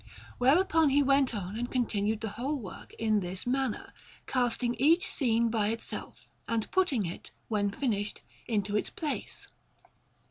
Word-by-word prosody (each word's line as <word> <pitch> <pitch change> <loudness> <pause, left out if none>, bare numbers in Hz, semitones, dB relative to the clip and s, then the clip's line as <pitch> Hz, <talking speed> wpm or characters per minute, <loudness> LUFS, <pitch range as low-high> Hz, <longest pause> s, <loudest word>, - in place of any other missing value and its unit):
Whereupon 315 +4 +4
he 285 +1 +4
went 275 -3 +3
on 195 0 -4
and 245 +1 -2
continued 220 -3 0
the 220 - -2
whole 265 +8 -2
work 200 -6 -9
in 215 -1 +2
this 185 0 -1
manner, 260 -1 -1 0.3
casting 245 -1 +1
each 330 +6 +5
scene 235 -4 +1
by 220 -2 +1
itself, 230 +2 -5 0.2
and 225 -2 -1
putting 295 - +2
it, 170 - -6 0.2
when 205 -2 +1
finished, 205 -2 -2 0.2
into 205 -3 0
its 210 - +1
place. 305 -3 -4
235 Hz, 145 wpm, -30 LUFS, 210-270 Hz, 0.3 s, each